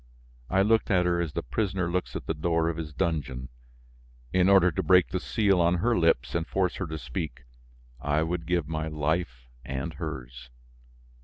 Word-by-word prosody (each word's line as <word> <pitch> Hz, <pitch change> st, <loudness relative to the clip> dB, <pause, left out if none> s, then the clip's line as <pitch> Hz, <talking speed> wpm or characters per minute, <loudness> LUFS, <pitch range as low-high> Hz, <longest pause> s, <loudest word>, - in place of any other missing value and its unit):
I 95 Hz, +1 st, +3 dB
looked 110 Hz, +2 st, +2 dB
at 90 Hz, -2 st, +3 dB
her 85 Hz, -1 st, +2 dB
as 80 Hz, -3 st, -3 dB
the -, -, -2 dB
prisoner 95 Hz, -5 st, -1 dB
looks 90 Hz, +2 st, -2 dB
at -, -, -5 dB
the -, -, -1 dB
door 80 Hz, +1 st, +1 dB
of 85 Hz, -, -3 dB
his 80 Hz, -2 st, -5 dB
dungeon. 70 Hz, -6 st, -2 dB, 0.8 s
In 95 Hz, 0 st, +4 dB
order 95 Hz, -2 st, +6 dB
to -, -, -1 dB
break 90 Hz, -1 st, +5 dB
the 95 Hz, -, -2 dB
seal 100 Hz, -2 st, +2 dB
on 85 Hz, +1 st, +3 dB
her 115 Hz, +7 st, +1 dB
lips 85 Hz, -, +2 dB
and 85 Hz, 0 st, -1 dB
force 95 Hz, -2 st, 0 dB
her 95 Hz, -, -3 dB
to 80 Hz, 0 st, -5 dB
speak, 65 Hz, 0 st, -5 dB, 0.6 s
I 75 Hz, +2 st, +1 dB
would 85 Hz, 0 st, -3 dB
give 85 Hz, -4 st, 0 dB
my 80 Hz, 0 st, -3 dB
life 75 Hz, -5 st, -2 dB, 0.2 s
and 65 Hz, +5 st, -4 dB
hers. 65 Hz, -6 st, -7 dB
85 Hz, 185 wpm, -27 LUFS, 75-90 Hz, 0.8 s, order